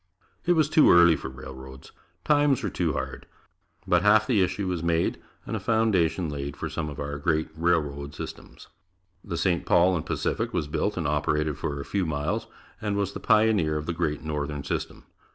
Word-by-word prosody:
It 175 - +5
was 155 -4 +3
too 155 0 +5
early 85 -1 +7
for 70 - -6
railroads. 65 0 -11 0.3
Times 145 -3 +3
were - - -2
too - - 0
hard. - - -5 0.6
But - - +3
half 105 +1 +5
the 110 -4 +2
issue 90 +1 -1
was 90 -3 -2
made, 85 0 0 0.2
and - - -4
a - - -2
foundation 95 -7 +1
laid 70 -1 -5
for - - -4
some 80 -2 -3
of 70 - -8
our 70 0 -4
great 80 +1 0
railroad 75 -4 -1
systems. - - -9 0.6
The 85 - -4
St. 85 0 +1
Paul 90 +2 +4
and 80 - -2
Pacific - - -2
was 75 - -1
built 100 +7 -1
and 85 -4 -1
operated 75 0 0
for 70 -1 -3
a 70 - -6
few 95 -4 -1
miles 80 +10 -2 0.3
and 105 -2 -1
was 100 -1 -1
the - - -6
pioneer 105 -8 +3
of 75 - -4
the 85 - -2
Great 75 -4 -2
Northern 75 -2 -3
system. - - -4
80 Hz, 190 wpm, -26 LUFS, 75-100 Hz, 0.6 s, early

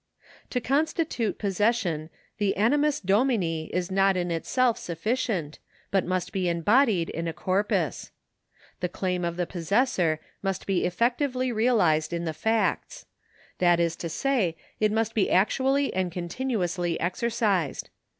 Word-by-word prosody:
To 250 - -1
constitute 280 - 0
possession 195 -6 0 0.3
the 200 -3 +1
animus 290 +7 +2
domini 195 -6 +1
is 180 +1 -2
not 195 0 +3
in 175 -1 -1
itself 240 +8 +1
sufficient, 180 - -2 0.3
but 195 -2 +1
must 185 -1 -1
be 185 -2 0
embodied 195 - +2
in 165 +1 -3
a 165 - -2
corpus. 190 +5 -1 0.7
The 180 - -1
claim 180 0 -2
of 170 0 -2
the 175 - 0
possessor 175 - +1 0.2
must 195 -2 -2
be 195 -2 +1
effectively 255 - 0
realised 195 -10 +2
in 170 0 -2
the 160 - -2
facts; 220 +6 -1 0.5
that 175 -1 +4
is 170 -1 +1
to 170 - -4
say, 200 - 0 0.2
it 215 -1 +2
must 225 +1 0
be 210 - +1
actually 270 +8 +2
and 185 -1 -1
continuously 175 -2 -2
exercised. 200 - -1
195 Hz, 135 wpm, -26 LUFS, 175-235 Hz, 0.7 s, that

